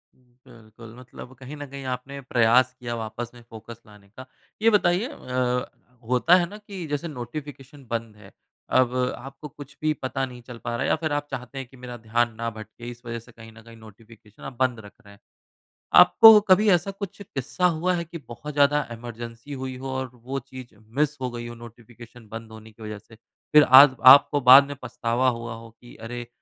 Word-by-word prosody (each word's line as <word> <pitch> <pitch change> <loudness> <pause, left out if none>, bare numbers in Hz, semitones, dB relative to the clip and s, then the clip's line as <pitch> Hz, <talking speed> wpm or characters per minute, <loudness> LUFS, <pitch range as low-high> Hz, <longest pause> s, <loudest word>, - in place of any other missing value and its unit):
बिल्कुल 115 -3 -17
मतलब 125 0 -12
कहीं 135 +3 -9
न 145 - -7
कहीं 140 0 -9
आपने 135 +3 -6
प्रयास 125 0 +3
किया 120 -2 -5
वापस 115 +1 -6
में 120 - -15
फ़ोकस 115 +1 -11
लाने 105 -1 -18
का। 130 +6 -12 0.4
यह 230 - +4
बताइए 200 +1 +2
अ, 125 - -2 0.4
होता 125 +8 +4
है 180 -1 +3
ना 210 - -10
कि 200 -4 -9
जैसे 145 +3 -3
नोटिफिकेशन 140 +1 -9
बंद 115 -2 -4
है। 100 -2 -16 0.4
अब 125 -1 +3 0.2
आपको 135 +3 -10
कुछ 145 +1 -13
भी 155 0 +1
पता 130 +1 -2
नहीं 125 -1 -11
चल 120 0 -11
पा 120 - -3
रहा - - -4
है - - -1
या - - +3
फिर 155 -1 -4
आप 145 0 -2
चाहते 130 0 -7
हैं 135 -2 -6
कि 130 - -18
मेरा 125 -1 -9
ध्यान 120 +1 0
ना 115 +1 -3
भटके 110 +2 -10
इस 120 0 -11
वजह 115 0 -5
से 115 +2 -18
कहीं 115 -1 -14
न 110 0 -16
कहीं 115 0 -15
नोटिफिकेशन 110 -1 -17
आप 135 - -7
बंद 125 -3 +1
रख 100 - -14
रहे 100 - -15
हैं। 100 - -20 0.8
आपको 225 -1 +9
कभी 210 +3 +5
ऐसा 185 +1 +2
कुछ 195 0 -8
किस्सा 180 0 -3
हुआ 180 +3 0
है 170 - -2
कि 170 +1 -9
बहुत 120 +6 -8
ज़्यादा 145 +1 +3
इमरजेंसी 120 +3 -9
हुई 130 -1 -5
हो 135 +1 -7
और 130 -1 -3
वो 125 +3 -6
चीज़ 130 -2 -12 0.2
मिस 150 0 +1
हो 130 - -2
गई 120 0 -7
हो 120 - -9
नोटिफिकेशन 120 0 -14
बंद 115 0 -8
होने 110 0 -13
की 110 +1 -15
वजह 105 0 -6
से। 115 - -19 0.4
फिर 150 0 +8 0.2
आज 140 -2 +7 0.2
आपको 145 0 0
बाद 140 +2 +10
में 145 - -7
पछतावा 120 +2 0
हुआ 115 0 -6
हो 115 0 -11
कि, 120 +2 -17
"अरे, 120 +2 -8
125 Hz, 210 wpm, -24 LUFS, 115-140 Hz, 0.8 s, बाद